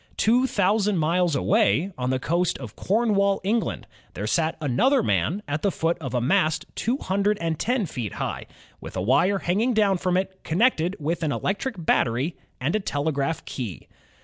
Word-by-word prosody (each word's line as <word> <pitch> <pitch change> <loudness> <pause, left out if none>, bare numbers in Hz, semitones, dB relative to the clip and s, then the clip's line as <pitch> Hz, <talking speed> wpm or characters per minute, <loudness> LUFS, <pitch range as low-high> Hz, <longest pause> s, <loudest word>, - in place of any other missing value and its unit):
Two 245 +4 +3
thousand 205 -2 +1
miles 170 0 +2
away, 200 +2 +2
on 125 0 -2
the 130 - +1
coast 170 +6 0
of 120 -5 -9
Corn 220 +2 +1
wall, 200 0 +2
England, 220 +4 -1 0.3
there 100 - -3
sat 160 +8 0
another 220 - +2
man 200 +2 0
at 145 +1 -2
the 200 - +2
foot 165 -2 0
of 130 -5 -5
a - - +2
mast 155 +4 +1
two 240 +4 -1
hundred 200 -1 0
and 165 -2 -2
ten 245 -2 0
feet 120 - -5
high, - - -4 0.3
with - - -8
a - - 0
wire 175 - +3
hanging 210 +7 0
down 200 -4 +3
from 180 0 +1
it 190 0 -3
connected 180 -1 +2
with 160 +4 -2
an 155 -3 0
electric 210 - -2
battery 130 +7 +1 0.2
and 140 +9 0
a - - +2
telegraph 145 -3 -2
key. 110 - -6
180 Hz, 180 wpm, -24 LUFS, 145-205 Hz, 0.3 s, Two